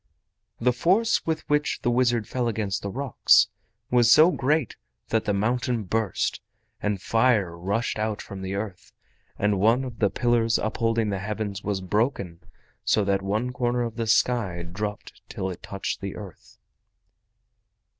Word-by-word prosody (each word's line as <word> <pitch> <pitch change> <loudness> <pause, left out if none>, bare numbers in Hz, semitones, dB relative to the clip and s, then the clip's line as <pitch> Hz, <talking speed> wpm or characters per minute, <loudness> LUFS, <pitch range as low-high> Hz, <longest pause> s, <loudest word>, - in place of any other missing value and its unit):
The 125 +1 +2
force 190 - +2
with 160 -1 -2
which 150 0 0
the 120 - +2
wizard 120 -3 +2
fell 125 -2 -1
against 105 -3 -2
the 100 - -4
rocks 135 +3 +3 0.4
was 120 -2 +5
so 155 +7 +7
great 145 -3 0 0.3
that 110 -1 +1
the - - +1
mountain 115 +3 0
burst, 110 0 -1 0.4
and 105 -2 -1
fire 110 -4 +2
rushed 100 +6 -2
out 110 -1 -1
from 100 -1 -8
the 95 +1 -4
earth, 100 -3 -6 0.4
and 105 -1 +1
one 115 +6 +3
of 120 -3 -7
the 100 - +3
pillars 115 0 +2
upholding 115 0 0
the 100 - -2
Heavens 105 0 -4
was 100 -3 -2
broken 100 -3 -1 0.4
so 105 - +2
that 100 0 +1
one 110 +6 -1
corner 120 0 0
of 115 -1 -4
the 115 -1 -2
sky 110 -7 +1
dropped 100 +4 -6
till 95 0 -3
it 90 - -9
touched 100 -1 -4
the 100 -1 -5
earth. 100 -5 -11
110 Hz, 155 wpm, -25 LUFS, 100-120 Hz, 0.4 s, so